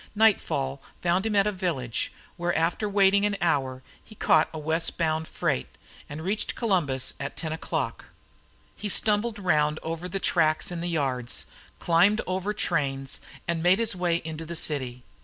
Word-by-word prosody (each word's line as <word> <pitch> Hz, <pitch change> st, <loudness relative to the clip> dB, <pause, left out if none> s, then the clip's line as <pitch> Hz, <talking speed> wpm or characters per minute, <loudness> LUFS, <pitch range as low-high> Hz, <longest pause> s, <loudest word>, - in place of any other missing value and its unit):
Nightfall 150 Hz, -11 st, +2 dB, 0.2 s
found 180 Hz, +4 st, +2 dB
him 215 Hz, -, -1 dB
at 200 Hz, -1 st, +5 dB
a 210 Hz, -, +2 dB
village, 165 Hz, -, -2 dB, 0.2 s
where 175 Hz, 0 st, -1 dB
after 170 Hz, +6 st, 0 dB
waiting 200 Hz, 0 st, +4 dB
an 205 Hz, -1 st, +1 dB
hour 135 Hz, -6 st, 0 dB, 0.2 s
he 215 Hz, -, -15 dB
caught -, -, +4 dB
a 160 Hz, -, -6 dB
westbound 160 Hz, 0 st, 0 dB
freight, 65 Hz, -, -1 dB, 0.4 s
and 150 Hz, +2 st, -6 dB
reached 200 Hz, +4 st, -1 dB
Columbus 160 Hz, -, +1 dB
at 140 Hz, 0 st, -5 dB
ten 160 Hz, -2 st, -2 dB
o'clock. 160 Hz, -, -3 dB, 0.7 s
He 210 Hz, -, -4 dB
stumbled 215 Hz, +3 st, +2 dB
round 155 Hz, -6 st, +2 dB
over 165 Hz, +2 st, -4 dB
the 195 Hz, -, -2 dB
tracks 165 Hz, +1 st, +2 dB
in 170 Hz, -1 st, -4 dB
the 175 Hz, -, -2 dB
yards, 130 Hz, -7 st, -1 dB, 0.3 s
climbed 180 Hz, +6 st, +4 dB
over 185 Hz, +2 st, -1 dB
trains, 135 Hz, -8 st, -1 dB, 0.3 s
and 170 Hz, -1 st, 0 dB
made 180 Hz, +3 st, +5 dB
his 225 Hz, -3 st, +1 dB
way 175 Hz, -2 st, +1 dB
into 160 Hz, 0 st, -5 dB
the 170 Hz, +1 st, -6 dB
city. 130 Hz, -6 st, -1 dB
170 Hz, 160 wpm, -27 LUFS, 150-195 Hz, 0.7 s, at